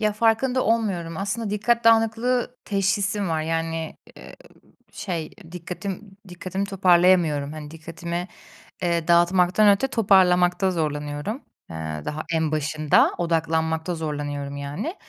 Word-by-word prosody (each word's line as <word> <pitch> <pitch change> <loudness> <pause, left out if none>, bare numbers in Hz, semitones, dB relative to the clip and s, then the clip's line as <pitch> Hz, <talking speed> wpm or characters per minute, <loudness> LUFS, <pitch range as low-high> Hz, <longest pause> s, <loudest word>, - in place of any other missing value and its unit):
Ya, 215 -1 +1
farkında 235 +4 +1
olmuyorum. 195 -8 -1
Aslında 200 +3 -3
dikkat 230 +3 +1
dağınıklığı 230 +2 +2
teşhisim 195 0 0
var. 160 -1 -1
Yani, 165 0 -3 0.2
eee, - - -12 0.5
b - - -34
şey... 170 -6 -4 0.2
Dikkatim 190 +3 -7
dikkatimi 185 +2 -4
toparlayamıyorum. 175 -6 +3
Hani, 150 -1 -8
dikkatimi, 170 +2 -6 0.6
eee, 170 -2 0
dağıtmaktan 180 +4 +4
öte 205 +7 +3
toparlamakta 185 -4 +3
zorlanıyorum, 150 - -3 0.3
eee, 80 -2 -5
daha 155 +1 -4
en 160 -1 0
başında; 155 0 +2
odaklanmakta 160 0 -1
zorlanıyorum 145 -3 -4
yani. 145 - -5
175 Hz, 115 wpm, -23 LUFS, 160-205 Hz, 0.6 s, dağıtmaktan